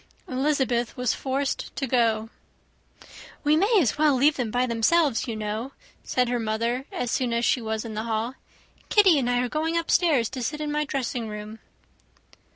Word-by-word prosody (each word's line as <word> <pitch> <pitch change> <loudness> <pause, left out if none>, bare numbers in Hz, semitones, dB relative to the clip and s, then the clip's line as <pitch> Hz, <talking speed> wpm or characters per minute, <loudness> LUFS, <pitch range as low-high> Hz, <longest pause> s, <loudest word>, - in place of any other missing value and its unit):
Elizabeth 260 -3 0
was 250 -2 +1
forced 270 +1 -3
to 275 - -2
go. 225 -3 +1 1.1
"We 300 0 +4
may 405 +6 +4
as 280 - 0
well 300 -3 +4
leave 290 +4 +4
them 245 -4 -2
by 245 +3 +1
themselves, 250 +3 +2
you 230 - -3
know," 215 +5 -4 0.3
said 250 -1 0
her 245 0 -1
mother 230 +4 -1
as 245 - -3
soon 250 -2 0
as 235 0 +1
she 250 - +2
was 220 0 -3
in 225 - -6
the 215 +1 -3
hall. 225 +2 -2 0.6
"Kitty 385 -8 +5
and 245 -2 -1
I 245 0 +2
are - - -1
going 320 +5 -1
upstairs 325 -7 +2
to 260 -1 -6
sit 300 +6 -3
in 300 -1 -3
my 300 0 0
dressing 250 -4 -3
room." 210 +1 -7
250 Hz, 180 wpm, -25 LUFS, 230-290 Hz, 1.1 s, Kitty